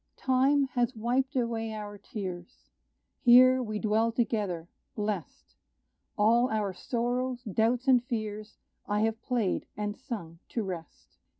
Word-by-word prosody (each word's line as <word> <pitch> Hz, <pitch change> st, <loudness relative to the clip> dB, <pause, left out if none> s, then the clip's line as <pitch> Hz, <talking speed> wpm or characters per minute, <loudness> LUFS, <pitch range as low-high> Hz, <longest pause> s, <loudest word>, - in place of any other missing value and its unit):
Time 270 Hz, +2 st, +3 dB
has 245 Hz, -1 st, 0 dB
wiped 250 Hz, +4 st, 0 dB
away 230 Hz, -3 st, -1 dB
our 205 Hz, -1 st, -6 dB
tears; 190 Hz, -5 st, -8 dB, 0.5 s
Here 255 Hz, +1 st, +7 dB
we 215 Hz, -3 st, -3 dB
dwell 220 Hz, +2 st, +1 dB
together 210 Hz, -8 st, -1 dB, 0.3 s
blest; 210 Hz, -4 st, -4 dB, 0.6 s
All 235 Hz, +4 st, +4 dB
our 210 Hz, -3 st, -1 dB
sorrows, 245 Hz, +5 st, -2 dB
doubts 230 Hz, +5 st, 0 dB
and 250 Hz, -2 st, +5 dB
fears 215 Hz, -4 st, -5 dB, 0.3 s
I 205 Hz, 0 st, +1 dB
have 225 Hz, +1 st, 0 dB
played 235 Hz, -7 st, -1 dB
and 210 Hz, 0 st, -2 dB
sung 185 Hz, -10 st, -7 dB
to 230 Hz, -, -2 dB
rest. 175 Hz, -5 st, -8 dB
225 Hz, 125 wpm, -29 LUFS, 210-245 Hz, 0.6 s, Here